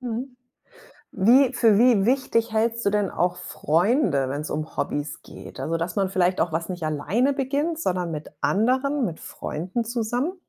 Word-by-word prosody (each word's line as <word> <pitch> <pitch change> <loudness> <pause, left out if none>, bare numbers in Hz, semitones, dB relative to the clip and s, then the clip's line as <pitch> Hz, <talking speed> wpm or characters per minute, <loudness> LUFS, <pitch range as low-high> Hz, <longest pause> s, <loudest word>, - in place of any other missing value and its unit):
Mhm. 250 +1 -5 0.8
Wie 250 +6 +5
für 225 -4 +4
wie 235 -4 +4
wichtig 235 -2 +1
hältst 230 +1 0
du - - +4
denn 205 -2 0
auch 180 0 -1
Freunde, 170 - +1
wenn's 145 +3 -4
um 155 +1 -5
Hobbys 145 0 -3
geht? - - -11
Also, 165 +1 -1
dass 170 +1 -3
man 195 -2 +1
vielleicht 185 -1 +1
auch 165 - 0
was 165 +1 -2
nicht 180 -2 -5
alleine 160 - 0
beginnt, 290 +4 -1
sondern 180 - -1
mit 150 -1 -6
anderen, 260 +6 +1
mit 165 -6 -5
Freunden 180 +10 -4
zusammen? 240 +7 -2
215 Hz, 165 wpm, -24 LUFS, 170-250 Hz, 0.8 s, Wie